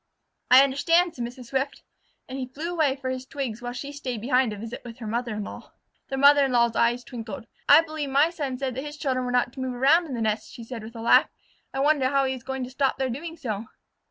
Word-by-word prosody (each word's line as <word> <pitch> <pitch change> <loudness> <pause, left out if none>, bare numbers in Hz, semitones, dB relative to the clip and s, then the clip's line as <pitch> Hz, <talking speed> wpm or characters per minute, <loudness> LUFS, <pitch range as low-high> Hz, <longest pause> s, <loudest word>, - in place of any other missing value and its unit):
"I 255 +2 +9
understand," 330 +6 +2
said 245 - -5
Mrs. 245 0 -8
Swift, 270 +1 -2 0.4
and 265 +1 -6
he 255 - -3
flew 305 +7 -5
away 305 -6 +2
for 260 -1 -3
twigs 255 -3 -5
while 245 0 -4
she 280 +3 -6
stayed 260 -5 -5
behind 250 0 +2
to 210 - -5
visit 230 +3 -7
with 235 -1 -9
her 240 - -8
mother 230 +1 -2
in 210 - -3
law. - - -10 0.4
The 270 - -2
mother 285 +1 +7
in 270 - -1
law's 235 -1 +3
eyes 240 +1 +2
twinkled. 235 0 -7 0.2
"I 290 +3 +9
believe 310 -3 -5
my 285 +5 +4
son 285 -7 -3
said 265 -1 -2
that 265 +3 -4
his 295 0 -7
children 260 -3 -1
were 245 - -2
not 245 -1 +1
to - - -10
move 260 -1 -3
around 305 +7 +4
in 265 - -4
the 235 - -3
nest," 215 0 -1
she 240 - -9
said 230 0 -7
with 225 +2 -10
a 225 - -6
laugh. 230 - +5 0.4
"I 270 - -2
wonder 285 -2 +3
how 275 0 +2
he 265 - 0
is 255 - -7
going 265 +1 -4
to 250 - -6
stop 270 0 0
their 260 -1 -1
doing 325 +6 -6
so." 220 -7 -4
260 Hz, 255 wpm, -25 LUFS, 240-280 Hz, 0.4 s, I